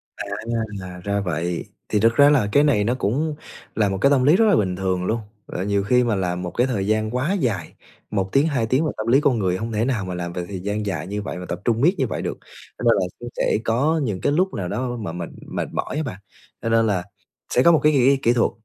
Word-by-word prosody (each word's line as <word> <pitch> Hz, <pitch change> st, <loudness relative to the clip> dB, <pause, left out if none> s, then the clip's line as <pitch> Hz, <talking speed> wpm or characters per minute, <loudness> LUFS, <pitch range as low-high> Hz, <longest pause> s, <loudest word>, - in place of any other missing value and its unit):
À, -, -, -6 dB, 0.8 s
ra 100 Hz, +1 st, 0 dB
vậy. 85 Hz, -1 st, -2 dB, 0.2 s
Thì 105 Hz, -, +2 dB
thực 115 Hz, +2 st, +3 dB
ra 145 Hz, +2 st, +7 dB
là 135 Hz, -8 st, +3 dB
cái 145 Hz, -, +5 dB
này 130 Hz, -9 st, +3 dB
nó 120 Hz, +4 st, +1 dB
cũng 145 Hz, +8 st, -1 dB, 0.4 s
là 105 Hz, -2 st, +2 dB
một 95 Hz, -, -2 dB
cái 140 Hz, -, +5 dB
tâm 135 Hz, -3 st, +3 dB
lý 150 Hz, +6 st, +6 dB
rất 225 Hz, -, +4 dB
là 205 Hz, -4 st, +5 dB
bình 95 Hz, -6 st, +1 dB
thường 95 Hz, -1 st, -1 dB
luôn. 115 Hz, +3 st, 0 dB, 0.3 s
Ờ, 90 Hz, -, -4 dB
nhiều 100 Hz, 0 st, 0 dB
khi 125 Hz, +4 st, +3 dB
mà 115 Hz, -3 st, +1 dB
làm 90 Hz, -2 st, -1 dB
một 90 Hz, -1 st, -4 dB
cái 125 Hz, -, +1 dB
thời 100 Hz, -6 st, -1 dB
gian 110 Hz, 0 st, +1 dB
quá 145 Hz, +10 st, 0 dB
dài, 115 Hz, -, -1 dB, 0.4 s
1 95 Hz, -2 st, -1 dB
tiếng, 140 Hz, +4 st, +3 dB
2 130 Hz, -7 st, 0 dB
tiếng 130 Hz, +8 st, +1 dB
mà -, -, 0 dB
tâm 110 Hz, +1 st, -4 dB
lý 135 Hz, +5 st, +5 dB
con 125 Hz, -6 st, +2 dB
người 95 Hz, -2 st, 0 dB
hông 115 Hz, +2 st, -4 dB
thể 110 Hz, +2 st, 0 dB
nào 115 Hz, -8 st, -1 dB
mà 90 Hz, -, -4 dB
làm 85 Hz, -1 st, -4 dB
việc 90 Hz, -, -3 dB
thời 95 Hz, -2 st, -5 dB
gian 105 Hz, +2 st, -3 dB
dài 90 Hz, -3 st, -3 dB
như 105 Hz, +1 st, -3 dB
vậy 100 Hz, -, -5 dB
mà 90 Hz, -, -6 dB
tập 85 Hz, -, -4 dB
trung 115 Hz, 0 st, +1 dB
miết 175 Hz, +7 st, +4 dB
như -, -, +1 dB
vậy -, -, -4 dB
được, -, -, -4 dB, 0.4 s
cho -, -, -7 dB
nên -, -, +5 dB
là -, -, +1 dB
cũng -, -, -7 dB
sẽ -, -, +2 dB
có 150 Hz, +8 st, +2 dB
những 105 Hz, -8 st, -2 dB
cái 145 Hz, -, +1 dB
lúc 185 Hz, +5 st, +1 dB
nào 95 Hz, -3 st, -3 dB
đó 125 Hz, +5 st, -2 dB
mà 100 Hz, -6 st, -4 dB
mình 85 Hz, -1 st, -5 dB, 0.2 s
mệt -, -, -3 dB
mỏi -, -, -3 dB
á 155 Hz, -, 0 dB
bạn. 100 Hz, -9 st, -6 dB, 0.4 s
Cho 115 Hz, -, -2 dB
nên 115 Hz, 0 st, +3 dB
là 95 Hz, -4 st, 0 dB, 0.5 s
sẽ 125 Hz, -, +4 dB
có 170 Hz, -, +7 dB
một 160 Hz, -, +5 dB
cái 150 Hz, -, +5 dB
kỹ 135 Hz, +1 st, +4 dB
kỹ 120 Hz, -, +3 dB
thuật, 120 Hz, -, +2 dB
110 Hz, 275 wpm, -22 LUFS, 95-135 Hz, 0.8 s, ra